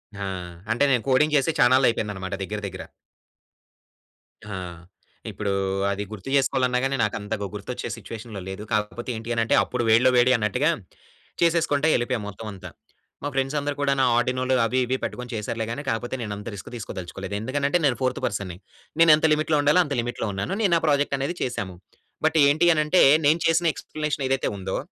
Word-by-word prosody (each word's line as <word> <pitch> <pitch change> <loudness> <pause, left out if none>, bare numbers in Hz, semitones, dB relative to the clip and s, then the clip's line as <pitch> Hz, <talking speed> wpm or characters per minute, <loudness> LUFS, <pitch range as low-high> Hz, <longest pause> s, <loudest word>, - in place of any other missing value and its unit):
ఆ! 100 0 -4 0.5
అంటే 120 +5 +2
నేను 125 -4 +2
కోడింగ్ 150 +3 +3
చేసే 140 +4 +2
చానాళ్ళైపోయిందనమాట 115 -7 +2
దగ్గర 105 +2 -4
దగ్గర. 95 -1 -7 1.6
ఆ! 105 -2 -6 0.8
ఇప్పుడు, 105 -2 -3 0.4
అది 100 +1 -2
గుర్తు 110 +4 -8
చేసుకోవాలన్నా 130 -2 +2
గాని 135 0 0
నాకు 105 - 0
అంతగా 105 0 -4
గుర్తొచ్చే 105 +4 -5
సిట్యుయేషన్‌లో 110 -3 -8
లేదు. 95 +2 -6
కాకపోతే 105 +4 -2
ఏంటి 110 +1 -7
అని 115 - +1
అంటే, 115 - +2
అప్పుడు - - -3
వేడిలో 115 +3 +6
వేడి 125 +1 +5
అన్నట్టుగా, 120 +8 +1 0.7
చేసేసుకుంట 165 -3 +2
ఎళ్ళిపోయాము 120 -3 -1
మొత్తం 105 +2 -9
అంతా. 95 - -9 0.5
మా - - -1
ఫ్రెండ్స్ 135 +2 -1
అందరూ 145 0 -3
కూడాను 140 -1 +2
ఆర్డినోలు, 130 +2 +1
అవి 130 +3 0
ఇవి 130 +2 -1
పెట్టుకొని 125 0 -5
చేసారులే 110 +1 -3
కాని, 140 +4 -5
కాకపోతే 120 +3 -2
నేను 105 -3 -4
అంత 105 - -9
రిస్క్ 100 - -9
తీసుకోదలుచుకోలేదు. 95 -2 -6
ఎందుకనంటే 140 +7 0
నేను 125 -4 +2
ఫోర్త్ 130 -1 0
పర్సన్‌ని 95 -3 -3 0.4
నేను 165 -1 +8
ఎంత 155 - 0
లిమిట్‌లో 155 0 +1
ఉండాలో, 150 +5 +4
అంత 145 - -4
లిమిట్‌లో 120 -1 -3
ఉన్నాను. 100 - -3
నేను 200 - +2
నా, - - +3
ప్రాజెక్ట్ 145 -1 +2
అనేది 140 +6 -2
చేశాము. 95 -7 -3 0.5
బట్ 160 0 +2
ఏంటి 155 +5 +3
అనంటే, 155 +4 +3 0.2
నేను 155 +3 +4
చేసిన 165 +1 +3
ఎక్స్‌ప్లేనేషన్ 150 -3 -3
ఏదైతే 135 0 0
ఉందో, 95 0 -3
125 Hz, 170 wpm, -24 LUFS, 105-145 Hz, 1.6 s, నేను